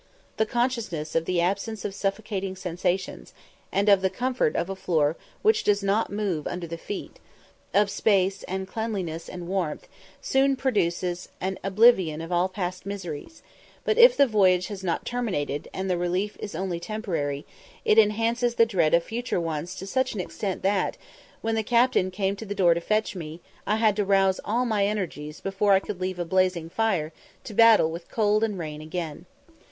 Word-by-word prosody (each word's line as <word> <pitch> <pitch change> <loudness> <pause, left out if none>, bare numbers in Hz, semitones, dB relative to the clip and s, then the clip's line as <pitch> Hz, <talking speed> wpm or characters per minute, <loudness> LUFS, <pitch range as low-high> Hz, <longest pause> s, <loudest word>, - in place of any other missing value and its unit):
The 220 - +2
consciousness 230 -11 -1
of 165 - +1
the 180 0 0
absence 200 +5 -2
of 200 - -3
suffocating 195 -1 -3
sensations, 180 - -3 0.4
and 200 +2 +1
of 200 -2 +6
the 190 - +2
comfort 245 -2 0
of - - 0
a 195 - -4
floor 160 -5 +1 0.3
which 435 0 +4
does 205 -1 +2
not 200 +3 +1
move 200 -7 -2
under 175 0 -4
the 170 0 -5
feet 205 - -7 0.5
of 205 +1 +4
space, 195 -1 +1
and 190 +1 -3
cleanliness, 190 -7 -4
and 175 -2 -7
warmth 180 -5 -2 0.3
soon 270 +1 +2
produce 180 -8 -1
an 190 +1 -3
oblivion 195 -5 +4
of 165 +2 -6
all 175 +2 +2
past 185 -1 -4
miseries; 195 - -7 0.4
but 440 - +1
if 485 +1 +8
the 280 - +7
voyage 185 -6 +3
has 200 -2 -7
not 170 -3 -1
terminated, 185 - -2
and 190 0 -4
the 180 -2 0
relief 180 +4 -1
is 200 - -6
only 180 -1 -2
temporary, 170 -9 -3 0.4
it 215 - +6
enhances 230 +3 +2
the 230 - +6
dread 175 -8 +2
of 170 - +2
future 235 -2 -2
ones 165 +2 -3
to 190 - -7
such 260 +4 0
an - - -4
extent 190 +1 -4
that, 195 -1 +1 0.4
when 225 0 -1
the 225 - +1
captain 235 -3 +3
came 195 +1 -1
to 205 - -8
the 205 - -4
door 180 -4 +5
to 170 - -3
fetch 215 +3 0
me, 160 -2 -7 0.3
I 210 - +2
had 220 -2 +3
to 210 - +2
rouse 195 -1 +3
all 240 +4 0
my 215 -4 +1
energies 165 -7 -4
before 195 +1 +2
I 190 - +6
could 195 -1 -7
leave 185 0 -2
a 175 - -2
blazing 180 -2 +1
fire 185 -9 0 0.3
to 215 - -8
battle 225 -7 +6
with 170 +1 -8
cold 215 -1 +2
and 210 -3 -1
rain 155 -3 -5
again. 160 -1 -5
195 Hz, 185 wpm, -26 LUFS, 175-215 Hz, 0.5 s, if